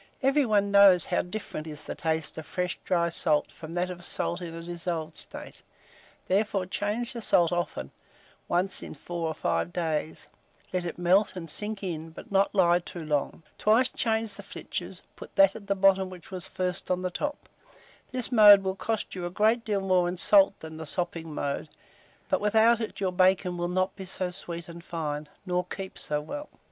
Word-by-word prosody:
Every 275 0 +3
one 205 -2 +2
knows 200 -4 +7
how - - +1
different 180 -5 -6
is 150 -1 -7
the - - -4
taste 160 -2 -2
of 155 - -9
fresh 180 -1 -2
dry 170 -2 +1
salt 155 -3 +1
from 160 0 -10
that 180 +1 -1
of 175 -1 -9
salt 175 +1 -3
in 170 -2 -5
a 165 - -7
dissolved 170 -2 -4
state; - - -5 0.7
therefore 195 0 +1
change 210 +6 -1
the 235 - -5
salt 175 -5 +3
often, 175 - -2 0.6
once 180 +2 +1
in - - -8
4 170 +2 -4
or 160 - -3
5 170 - -1
days; 160 -3 -2 0.5
let 180 -1 -1
it - - -6
melt 185 +4 +3
and 175 -2 -6
sink 210 +5 -2
in, 165 -3 -4
but 160 - -12
not 195 +1 +2
lie 175 -2 +5
too 175 -2 -8
long; 150 +1 -1 0.2
twice 230 +4 +4
change 220 -3 -1
the - - -7
flitches, 185 -2 -6
put - - -12
that 195 0 +6
at 200 -2 -10
bottom 190 -1 +4
which 180 -1 -12
was 185 -3 -4
first 180 0 -3
on 180 0 0
the 180 - -1
top: 290 +10 -4 0.6
this 255 -1 -1
mode 205 -4 +9
will 190 0 -1
cost 220 +2 -2
you 180 -2 -4
a - - -4
great 220 +5 +2
deal 205 -3 0
more 185 -2 +2
in 180 - -4
salt 195 +2 +5
than 160 0 -8
the 160 -1 -7
sopping 165 0 -3
mode, 140 -1 -3 0.6
but - - +1
without 220 +3 +4
it 220 - -5
your 190 -2 0
bacon 185 0 +3
will 175 0 -2
not 185 +1 0
be 190 - -8
so 185 0 -3
sweet 170 -2 -6
and 170 0 -10
fine, 150 -3 -4 0.2
nor 180 -1 0
keep 190 +1 -7
so 150 -1 0
well. 290 - -7
180 Hz, 195 wpm, -28 LUFS, 170-200 Hz, 0.7 s, mode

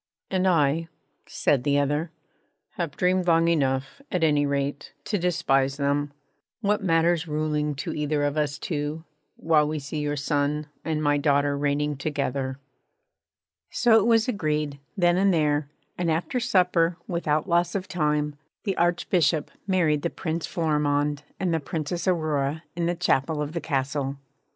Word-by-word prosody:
'And 190 0 +2
I,' 165 -1 +2 0.4
said 135 -4 +1
the 145 +1 +2
other, 145 +3 0 0.6
'have 170 -8 -4
dreamed 180 0 +2
long 165 0 +4
enough, 140 - 0
at 180 -2 0
any 145 -2 +3
rate, 140 0 -2
to 205 - -1
despise 140 -6 +1
them. 145 0 0 0.5
What 210 -1 +1
matters 170 -1 +2
ruling 150 -1 -1
to 135 - -4
either 150 -1 0
of 145 0 0
us 145 -2 0
two, 150 0 -3 0.3
while 155 -2 +3
we 155 +1 -2
see 145 +2 -5
your 145 0 -1
son 145 +1 0 0.2
and 155 -1 -1
my 145 -1 +3
daughter 145 -1 +2
reigning 145 0 0
together?' 140 -2 -2 1.1
So 235 -2 +4
it 215 - +1
was 225 -1 +4
agreed, 150 - -1 0.2
then 175 -1 +3
and 195 +1 +4
there; 150 -3 +1 0.3
and 175 -2 0
after 165 +10 0
supper, 180 -7 +2
without 160 -3 0
loss 175 0 +1
of 190 -1 -2
time, 150 -3 0 0.3
the 195 -4 -1
Archbishop 175 -2 +1 0.2
married 165 -6 +2
the 170 - -1
Prince 165 -1 -3
Florimond 150 -3 0 0.2
and 180 -3 0
the 165 - +1
Princess 160 +4 -4
Aurora 155 -3 0
in 170 -1 0
the 175 - 0
chapel 160 -3 +1
of 150 0 -2
the 170 - -3
Castle. 140 -1 -2
155 Hz, 155 wpm, -25 LUFS, 145-175 Hz, 1.1 s, long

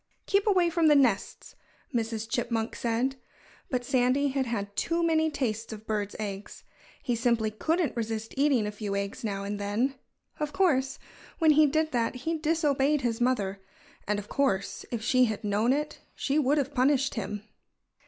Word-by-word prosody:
"Keep 400 +1 +1
away 365 -4 +4
from 330 -1 +3
the 300 - +6
nests!" 245 -8 +1 0.4
Mrs. 225 -2 -2
Chipmunk 230 -2 -1
said. 245 +3 -1 0.5
But 250 -2 -1
Sandy 255 +3 +2
had 265 -1 -1
had 200 -3 -3
too 340 0 0
many 320 -1 +3
tastes 230 -7 -2
of 220 0 -8
birds' 210 -2 -2
eggs. 205 -1 -6 0.4
He 245 - 0
simply 230 -2 +1
couldn't 320 +8 0
resist 225 -1 -3
eating 275 -5 +3
a 210 - -2
few 205 -1 -4
eggs 200 +2 -3
now 200 -3 -2
and 205 +1 -4
then. 210 +7 0 0.5
Of 300 -1 -2
course, 270 -8 +2 0.4
when 320 -2 +5
he 305 0 +6
did 310 +2 +1
that 235 0 0
he 330 0 +1
disobeyed 300 -3 +1
his 240 -1 -1
mother. 200 -6 0 0.5
And 210 0 +1
of 205 0 -6
course, 200 -9 -1
if 230 -2 -4
she 255 +2 +4
had 220 -1 -3
known 210 +4 +2
it 295 +2 -1 0.2
she 285 +2 0
would 290 +1 +2
have 280 0 -1
punished 275 +1 +2
him. 210 -1 -4
245 Hz, 175 wpm, -28 LUFS, 215-290 Hz, 0.5 s, the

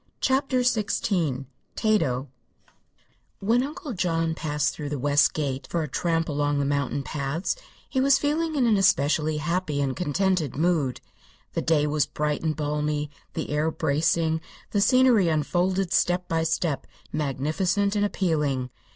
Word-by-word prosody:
CHAPTER 265 -1 +1
XVI 195 - 0 0.3
TATO 155 - +1 1.1
When 230 +5 +2
Uncle 295 +1 -5
John 165 -3 0
passed 150 -2 -1
through 150 -2 -5
the 145 - -2
west 145 +2 +3
gate 140 -3 -2
for 170 -2 -1
a - - -3
tramp 165 +3 0
along 145 -1 0
the 140 - +1
mountain 140 0 -1
paths 140 +5 -2 0.3
he 260 - 0
was 275 0 +5
feeling 315 +2 0
in 265 -4 +2
an 220 -3 +4
especially 155 -3 +2
happy 155 -1 -1
and 135 -2 0
contented 180 -3 0
mood. 155 -5 +1 0.5
The - - -1
day 155 -2 +2
was 150 -1 +1
bright 150 0 -2
and 160 -1 -1
balmy, 150 0 -2 0.2
the - - -3
air 150 +2 +1
bracing, 160 +1 +1 0.3
the 205 - +1
scenery 250 -4 +5
unfolded 175 +4 0
step 180 -1 +2
by 165 0 0
step 160 -3 -1 0.3
magnificent 160 - 0
and 205 - +2
appealing. 150 -10 0
160 Hz, 145 wpm, -25 LUFS, 145-195 Hz, 1.1 s, was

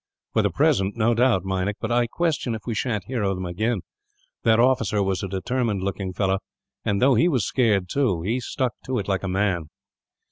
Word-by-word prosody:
"For - - +3
the - - +2
present, 95 +3 +1
no 115 +1 +3
doubt, 115 -6 +2
Meinik; 95 +1 -1
but 110 - -3
I 120 0 +3
question 150 -4 -1
if 110 - -8
we 120 - -2
sha'n't 105 -2 -1
hear 120 +4 -3
of 95 -1 0
them, 90 0 -4
again. 105 +4 -1 0.6
That 115 0 +4
officer 115 -5 +3
was 95 -1 -1
a 100 - -3
determined 100 +1 -1
looking 95 -1 -3
fellow 95 +1 0 0.4
and, 100 - 0
though 130 +2 +5
he 120 +9 +4
was 130 - +1
scared, 105 -8 +2
too, 95 -8 0
he 115 +7 0
stuck 125 0 -2
to 130 -1 -1
it 100 - -3
like 95 -2 0
a 100 - -3
man." 95 -4 0
105 Hz, 210 wpm, -24 LUFS, 95-120 Hz, 0.6 s, though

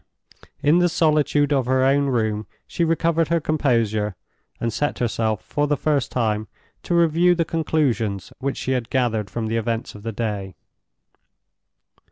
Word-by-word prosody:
In 155 +4 +5
the 175 0 +3
solitude 150 -3 +2
of 135 -3 +1
her 130 0 +2
own 140 +1 +3
room 110 -4 -1 0.2
she 170 - -2
recovered 165 0 +1
her 170 0 +2
composure, 115 - 0 0.4
and 115 -1 -2
set 145 - -1
herself 110 -2 -1
for 145 0 -1
the 145 0 +1
first 145 -4 0
time 110 -3 0 0.3
to 175 - -1
review 170 +1 +4
the 165 -1 0
conclusions 135 - -1
which 140 0 -2
she 130 - -3
had 125 -3 -1
gathered 115 -6 0
from 115 +3 -3
the 115 +1 -1
events 115 0 -2
of 105 - -11
the 115 +2 -4
day. 100 -4 -4
130 Hz, 160 wpm, -22 LUFS, 110-155 Hz, 0.4 s, In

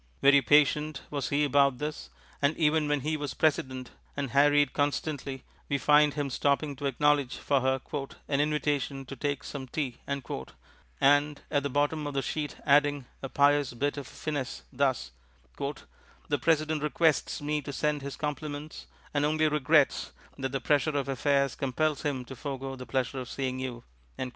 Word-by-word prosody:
Very 140 0 +7
patient 150 0 +3
was 140 -3 -2
he 145 +1 +2
about 140 -2 +3
this, 150 +3 -5 0.3
and 145 +2 +2
even 155 -1 +2
when 145 -1 +1
he 155 +3 -1
was 145 -1 -4
President 130 -5 0 0.3
and 140 -4 -2
harried 145 +1 +4
constantly 145 -2 -2 0.3
we 140 - +2
find 150 +1 +4
him 145 -2 -2
stopping 140 +2 +1
to 140 0 -2
acknowledge 145 0 +2
for 140 -2 +1
her 130 +1 +1 0.5
"an 140 0 +1
invitation 145 -2 -1
to 135 - -8
take 145 +2 -2
some 135 -2 -6
Tea," 130 -3 -3
and 140 - -1
at 145 -2 +2
the 140 - -2
bottom 145 +2 0
of 145 - -5
the 135 - 0
sheet 150 +2 -3
adding 145 -1 +3 0.2
a 135 - -5
pious 145 -1 +3
bit 145 +4 0
of 140 -3 -6
finesse, 145 -4 -4
thus: 130 - 0 0.5
"The 140 0 -5
President 155 -1 +2
requests 155 +1 +1
me 150 +1 -1
to 145 - -6
send 150 +1 0
his 140 0 -5
compliments 150 0 -5 0.3
and 145 -1 +1
only 155 +1 +2
regrets 150 0 +2 0.2
that 135 -1 -3
the 135 - -1
pressure 145 +2 +2
of 140 -1 -2
affairs 140 +1 +2
compels 145 +2 -1
him 135 -4 -2
to 130 - -9
forego 135 -1 -5
the 125 -1 -9
Pleasure 130 0 -1
of 125 -1 -6
seeing 130 -1 -3
you." 125 -2 -5
145 Hz, 165 wpm, -29 LUFS, 135-150 Hz, 0.5 s, Very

